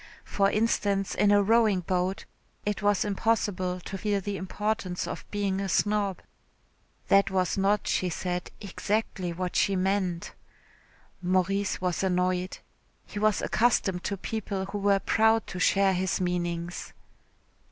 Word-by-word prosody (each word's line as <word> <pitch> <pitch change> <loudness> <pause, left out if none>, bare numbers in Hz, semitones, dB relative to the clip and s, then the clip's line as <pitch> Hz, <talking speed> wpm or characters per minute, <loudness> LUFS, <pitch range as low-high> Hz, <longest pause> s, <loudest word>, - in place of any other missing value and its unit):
For 195 -1 +2
instance, 205 -2 +1
in 210 - +3
a 205 0 +5
rowing 215 -3 +3
boat, 185 +2 -1 0.4
it 210 0 -1
was 205 0 +2
impossible 200 -3 0
to 195 +2 -6
feel 205 -1 0
the 200 +1 -4
importance 190 -1 -2
of - - -7
being 200 -2 -1
a 195 - -3
snob. 205 0 0 0.9
That 195 0 +5
was 185 -2 0
not, 200 +1 +1
she 185 - +1
said, 180 +1 -3
exactly 200 -2 -2
what 180 +1 -4
she 200 - +3
meant.... 185 -2 -1 0.9
Maurice 185 +2 0
was 180 -2 0
annoyed. 185 0 0 0.5
He 205 - -6
was 215 -2 +2
accustomed 200 -6 +1
to 200 - -2
people 200 -1 -3
who 205 - -3
were 200 0 +3
proud 220 +3 +3
to 180 - -7
share 195 +1 +3
his 185 +2 0
meanings. 175 -1 -3
195 Hz, 140 wpm, -28 LUFS, 185-205 Hz, 0.9 s, a